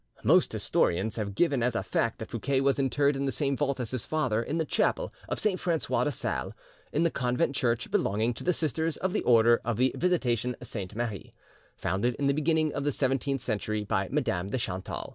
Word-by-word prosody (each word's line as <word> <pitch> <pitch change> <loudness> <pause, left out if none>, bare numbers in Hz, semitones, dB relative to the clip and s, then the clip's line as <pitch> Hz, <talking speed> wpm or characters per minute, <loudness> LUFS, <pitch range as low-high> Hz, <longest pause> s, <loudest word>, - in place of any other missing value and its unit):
Most - - +4
historians 100 +5 +1
have 100 -3 -3
given 145 -5 +2
as 120 0 +1
a - - 0
fact 115 -1 0
that 110 - -8
Fouquet 130 +3 0
was 135 +1 +2
interred 140 +1 +2
in 135 0 -1
the 135 - 0
same 140 -1 0
vault 140 -1 -1
as 120 -3 -3
his 130 -4 -2
father 130 -8 0
in 145 +7 -3
the 160 - 0
chapel - - 0 0.2
of - - -2
Saint 200 -4 0
Francois 170 -3 0
de - - +1
Sales - - -3 0.4
in - - +1
the 170 - +2
convent 125 +1 0
church 120 -3 0
belonging 110 +4 +1
to - - -8
the 180 - +3
Sisters 160 -1 -1
of 185 0 -2
the - - +1
Order 115 -1 +5
of 115 -2 -1
the 130 +2 +2
Visitation 125 -9 +1
Sainte 100 -2 -6
Marie, 115 -4 -4 0.5
founded 120 +5 0
in 140 - -2
the 140 - +3
beginning 155 +1 +1
of 140 - -2
the 145 - +1
seventeenth 135 0 0
century 110 -2 -2
by 95 -1 -1
Madame 110 -11 -1
de 115 - -2
Chantal. 95 -7 -4
125 Hz, 215 wpm, -28 LUFS, 115-145 Hz, 0.5 s, Order